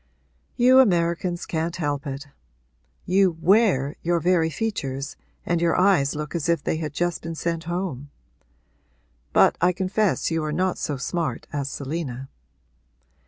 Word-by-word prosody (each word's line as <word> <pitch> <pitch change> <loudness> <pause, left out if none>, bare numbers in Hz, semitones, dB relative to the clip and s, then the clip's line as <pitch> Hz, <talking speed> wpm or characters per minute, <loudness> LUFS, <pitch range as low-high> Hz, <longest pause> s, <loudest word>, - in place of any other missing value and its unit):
'You 255 +1 +6
Americans 175 -5 +2
can't 165 +1 -2
help 145 -4 -2
it; 140 +1 -5 0.8
you 185 -2 +3
"wear" 170 - +3
your 170 0 +1
very 170 -1 +2
features 145 - -3 0.3
and 170 -1 0
your 170 0 +2
eyes 180 -8 +3
look 150 0 -5
as 170 -2 -2
if 170 -3 +1
they - - -1
had 155 -2 -4
just 175 +2 -1
been 165 0 -5
sent 165 0 -3
home. 170 -6 -4 1.2
But - - +4
I 180 - +4
confess 190 +1 0
you 165 -1 0
are 155 - -2
not 180 +3 0
so 145 - -2
smart 165 +5 -3
as 140 -2 -2
Selina.' 135 -3 -5
170 Hz, 145 wpm, -24 LUFS, 145-180 Hz, 1.2 s, You